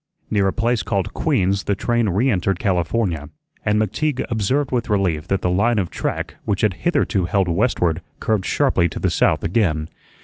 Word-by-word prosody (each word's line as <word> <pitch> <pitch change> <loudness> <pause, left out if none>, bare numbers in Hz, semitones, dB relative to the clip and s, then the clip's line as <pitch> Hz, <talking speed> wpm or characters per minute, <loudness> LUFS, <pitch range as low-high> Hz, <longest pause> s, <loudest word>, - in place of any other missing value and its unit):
Near 100 -2 +2
a - - +2
place 120 -1 +1
called 100 -3 -2
Queen's 100 - +1
the 100 - +1
train 120 +1 0
reentered 95 -2 +1
California, 90 -4 -1 0.3
and 105 0 +2
McTeague 130 +7 -1
observed 130 +6 0
with 120 -3 -1
relief 90 -6 0
that 95 -1 -1
the 90 - +2
line 110 +6 +2
of 95 -4 -1
track - - -3
which 100 -2 -1
had 105 -3 +2 0.2
hitherto 100 - +1
held 95 +1 +1
westward 90 -3 +1 0.2
curved 110 -4 0
sharply 85 0 +2
to - - -6
the - - 0
south - - +2
again. 80 -5 0
100 Hz, 175 wpm, -21 LUFS, 90-115 Hz, 0.3 s, Near